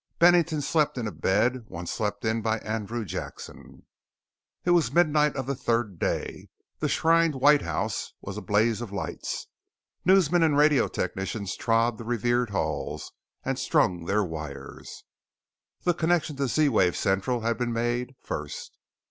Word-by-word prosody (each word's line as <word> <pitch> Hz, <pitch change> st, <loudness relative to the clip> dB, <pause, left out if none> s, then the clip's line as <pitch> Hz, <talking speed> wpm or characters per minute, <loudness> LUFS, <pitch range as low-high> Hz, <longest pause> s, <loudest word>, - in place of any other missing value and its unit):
Bennington 170 Hz, -3 st, +4 dB
slept 150 Hz, 0 st, +1 dB
in 120 Hz, -, -2 dB
a 105 Hz, -, -3 dB
bed 120 Hz, +7 st, +1 dB
once 85 Hz, 0 st, -5 dB
slept 105 Hz, +2 st, -3 dB
in 110 Hz, +1 st, +1 dB
by 110 Hz, 0 st, 0 dB
Andrew 110 Hz, +1 st, -3 dB
Jackson. 90 Hz, -, -8 dB, 0.8 s
It 175 Hz, -, +3 dB
was 165 Hz, -9 st, +3 dB
midnight 150 Hz, -2 st, +3 dB
of 135 Hz, -2 st, -3 dB
the 140 Hz, -, -1 dB
third 115 Hz, -7 st, -1 dB
day. -, -, -3 dB, 0.3 s
The -, -, 0 dB
shrined 165 Hz, -1 st, +3 dB
White 145 Hz, +2 st, +5 dB
House -, -, -3 dB
was 100 Hz, -, -7 dB
a 105 Hz, -, -5 dB
blaze 105 Hz, +4 st, +1 dB
of 115 Hz, -4 st, -6 dB
lights. 100 Hz, -, -4 dB, 0.6 s
Newsmen 180 Hz, -2 st, +4 dB
and 155 Hz, -3 st, +3 dB
radio 150 Hz, -2 st, +4 dB
technicians 95 Hz, 0 st, -3 dB
trod 115 Hz, 0 st, +1 dB
the -, -, -6 dB
revered 120 Hz, +1 st, 0 dB
halls 100 Hz, -, -3 dB, 0.3 s
and -, -, -1 dB
strung 85 Hz, -2 st, +1 dB
their 105 Hz, +3 st, +1 dB
wires. 80 Hz, -5 st, -8 dB, 0.8 s
The 175 Hz, -, +3 dB
connection 165 Hz, -2 st, 0 dB
to 140 Hz, -1 st, 0 dB
Z 150 Hz, +4 st, +3 dB
wave 95 Hz, -8 st, +3 dB
Central 100 Hz, +6 st, 0 dB
had 115 Hz, 0 st, -1 dB
been 120 Hz, -1 st, -1 dB
made, 120 Hz, +2 st, -1 dB
first. 75 Hz, -1 st, -6 dB
120 Hz, 155 wpm, -27 LUFS, 105-150 Hz, 0.8 s, White